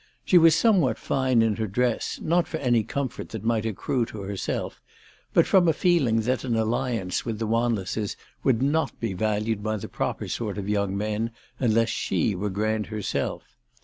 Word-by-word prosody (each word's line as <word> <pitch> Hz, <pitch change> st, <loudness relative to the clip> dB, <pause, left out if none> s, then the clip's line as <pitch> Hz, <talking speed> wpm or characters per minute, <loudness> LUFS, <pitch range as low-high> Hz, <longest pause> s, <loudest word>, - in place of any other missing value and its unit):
She 180 Hz, -, +6 dB
was 165 Hz, -1 st, +6 dB
somewhat 170 Hz, -, +3 dB
fine 130 Hz, -3 st, +2 dB
in 110 Hz, -2 st, +1 dB
her 110 Hz, -, -1 dB
dress, 120 Hz, +3 st, -1 dB
not 170 Hz, 0 st, +2 dB
for 160 Hz, -, -3 dB
any 120 Hz, -6 st, +2 dB
comfort 135 Hz, +3 st, -4 dB
that 110 Hz, -3 st, -6 dB
might 115 Hz, -1 st, +1 dB
accrue 115 Hz, +3 st, -1 dB
to 105 Hz, -, -8 dB
herself, 100 Hz, 0 st, -4 dB, 0.5 s
but -, -, +4 dB
from 185 Hz, -3 st, +4 dB
a 160 Hz, -, +4 dB
feeling 145 Hz, -10 st, +2 dB
that 125 Hz, +2 st, -1 dB
an 120 Hz, -3 st, 0 dB
alliance 110 Hz, -4 st, -1 dB
with 115 Hz, -3 st, -3 dB
the 110 Hz, -, -2 dB
Wanlesses 110 Hz, -3 st, -1 dB, 0.3 s
would 130 Hz, -2 st, +2 dB
not 145 Hz, +1 st, 0 dB
be 115 Hz, -4 st, -2 dB
valued 110 Hz, +2 st, -1 dB
by 110 Hz, +1 st, -1 dB
the 100 Hz, -, -6 dB
proper -, -, -3 dB
sort 105 Hz, -4 st, -3 dB
of 100 Hz, -1 st, -4 dB
young 100 Hz, -1 st, 0 dB
men 110 Hz, +2 st, -1 dB, 0.3 s
unless 115 Hz, -2 st, +2 dB
she 110 Hz, -, 0 dB
were 100 Hz, +3 st, -2 dB
grand 105 Hz, +2 st, -1 dB
herself. 105 Hz, -2 st, -4 dB
115 Hz, 180 wpm, -25 LUFS, 105-130 Hz, 0.5 s, She